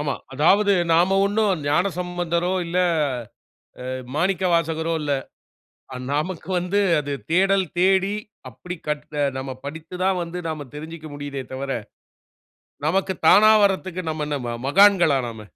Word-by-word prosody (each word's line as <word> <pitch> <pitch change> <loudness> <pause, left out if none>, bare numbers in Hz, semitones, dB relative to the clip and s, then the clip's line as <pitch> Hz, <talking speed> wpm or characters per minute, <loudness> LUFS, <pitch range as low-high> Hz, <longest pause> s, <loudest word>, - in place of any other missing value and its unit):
ஆமா. 145 -1 -1 0.2
அதாவது 200 +8 +4 0.2
நாம 180 +4 +4
ஒண்ணும் 205 -4 +1
ஞானசம்பந்தரோ, 175 +1 0
இல்ல 175 +2 -1 1.1
அ - - -4 0.3
மாணிக்கவாசகரோ 165 -2 +1
இல்ல. 145 -1 -1 1.0
நமக்கு 165 +3 -3
வந்து 180 +3 0 0.2
அது 145 -1 -5 0.2
தேடல் 195 +2 +3
தேடி 190 +2 +3 0.4
அப்டி 180 +9 -8
கற்ற 150 0 -4 0.2
நம்ம 130 0 -5
படித்து 160 +4 -8
தான் 190 -1 +2
வந்து 170 +1 -6
நாம 150 -3 -5
தெரிஞ்சுக்க 160 +1 -8
முடியுதே 145 -2 -5
தவிர, 135 +1 -4 1.2
நமக்கு 190 +3 +1 0.2
தானா 215 +1 +7
வர்றதுக்கு 185 -2 -1
நம்ம 155 -1 -3
என்ன 145 -1 -2
ம 120 0 -3
மகான்களா 180 -3 +5
நாம? 110 -1 -8
170 Hz, 125 wpm, -23 LUFS, 150-190 Hz, 1.2 s, தானா